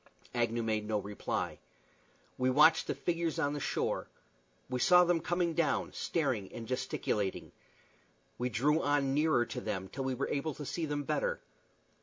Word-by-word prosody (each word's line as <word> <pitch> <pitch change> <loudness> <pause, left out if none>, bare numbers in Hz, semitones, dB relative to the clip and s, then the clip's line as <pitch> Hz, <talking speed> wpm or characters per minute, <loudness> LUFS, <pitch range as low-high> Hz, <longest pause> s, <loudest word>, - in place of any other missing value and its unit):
Agnew 120 -1 0
made 110 -1 -1
no 110 -1 +1
reply. 100 0 -3 0.8
We 130 0 +1
watched 150 +5 +5
the - - -1
figures 170 -2 -1
on 145 0 +1
the 145 - -3
shore. - - -1 0.6
We 125 -1 -2
saw 180 +7 +7
them 175 -1 +2
coming 175 0 0
down, 170 - 0
staring 130 - -1
and 115 - -7
gesticulating. 105 -5 -2 0.9
We 125 +1 0
drew 145 +8 +2
on 145 -2 +1
nearer 150 -4 +3
to - - -5
them 95 0 -3
till 135 - -4
we 130 -1 -1
were 135 - -2
able 145 0 -2
to 150 - -7
see 165 +3 -2
them 145 0 -2
better. - - -1
140 Hz, 165 wpm, -32 LUFS, 120-160 Hz, 0.9 s, saw